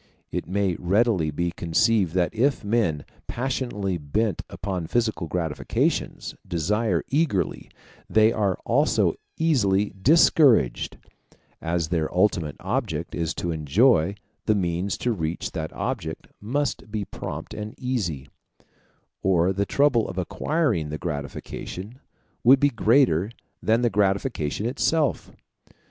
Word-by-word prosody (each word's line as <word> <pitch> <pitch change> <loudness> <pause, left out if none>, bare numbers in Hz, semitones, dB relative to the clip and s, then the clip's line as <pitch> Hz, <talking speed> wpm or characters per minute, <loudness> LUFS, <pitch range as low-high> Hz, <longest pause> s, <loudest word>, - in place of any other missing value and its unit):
It - - -3
may 95 -1 0
readily 95 -3 +2
be 85 +4 -1
conceived 90 +2 +1
that 90 -2 +1
if 130 +4 +1
men, 100 -9 0 0.2
passionately 120 -7 -2
bent 100 +6 -1
upon 90 -3 -4
physical 110 -6 0
gratifications, 80 -3 -1
desire 95 +2 0
eagerly, 135 - 0 0.4
they 110 +1 +5
are 100 -4 0
also - - +2 0.2
easily 105 -11 +2
discouraged: 130 - +4 0.6
as 85 -1 -1
their 80 -3 0
ultimate 90 -6 +1
object 95 - -2
is 85 -2 -2
to 85 - -2
enjoy, 80 - +3 0.3
the 110 - +4
means 90 0 -1
to 125 - 0
reach 85 -5 -3
that 80 -3 -4
object 100 -12 -4 0.2
must 130 +2 -2
be 105 -2 -2
prompt - - -7
and 105 +1 -6
easy, 95 - -2 0.9
or 95 -1 +3
the 100 +1 -1
trouble 135 -7 +2
of 95 - -7
acquiring 110 - 0
the 75 - -4
gratification 90 - -6 0.4
would 130 +3 +7
be 145 - +4
greater 115 - +3 0.3
than 115 +2 +2
the 120 - +4
gratification 100 - 0
itself. 145 +3 0
100 Hz, 120 wpm, -25 LUFS, 85-115 Hz, 0.9 s, would